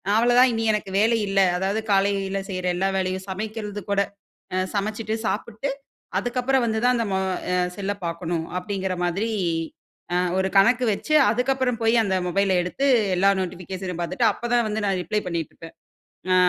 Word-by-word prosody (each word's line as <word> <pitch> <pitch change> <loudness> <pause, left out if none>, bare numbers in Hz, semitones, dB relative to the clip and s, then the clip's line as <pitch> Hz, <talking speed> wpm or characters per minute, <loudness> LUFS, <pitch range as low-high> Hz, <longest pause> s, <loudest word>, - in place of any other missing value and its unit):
அவ்வளோ 240 +2 +4
தான் 255 0 +7
இனி 225 -1 -1
எனக்கு 210 -2 -3
வேலை 225 +2 +3
இல்ல. 195 0 +1 0.2
அதாவது 195 +3 0
காலையில 195 0 +1
செய்ற 185 -1 -4
எல்லா 190 +2 +1
வேலையும் 185 0 -2
சமைக்கிறது 210 +1 -4
கூட, 200 0 +2 0.5
அ - - +1 0.2
சமைச்சுட்டு, 215 +2 -2
சாப்புட்டு, 225 +6 -2 0.5
அதுக்கப்பறம் 250 +3 0
வந்து 220 -1 0
தான் 250 0 +4
அந்த 230 - 0
மொ 190 - +1 0.3
அ - - +2 0.2
செல்ல 200 0 -2
பார்க்கணும்." 170 -1 -3
அப்படீங்குற 190 -1 -3
மாதிரி 195 +6 -1 0.9
அ - - +3 0.2
ஒரு 190 - +1
கணக்கு 240 +6 +5
வச்சு, 305 - -3 0.2
அதுக்கப்பறம் 250 0 0
போய் 225 +1 +4
அந்த 190 -3 0
மொபைல 195 0 +2
எடுத்து 270 +10 -1 0.3
எல்லா 195 +2 +4
நோட்டிஃபிகேஷனும் 180 0 -5
பார்த்துட்டு, 225 +7 +1
அப்ப - - -16
தான் 235 -2 +3
வந்து 215 +1 -2
நா - - +2
ரிப்ளை 210 +5 -1
பண்ணீட்டுருப்பேன். 165 -1 -5 0.6
அ - - +5
200 Hz, 165 wpm, -24 LUFS, 190-225 Hz, 0.9 s, தான்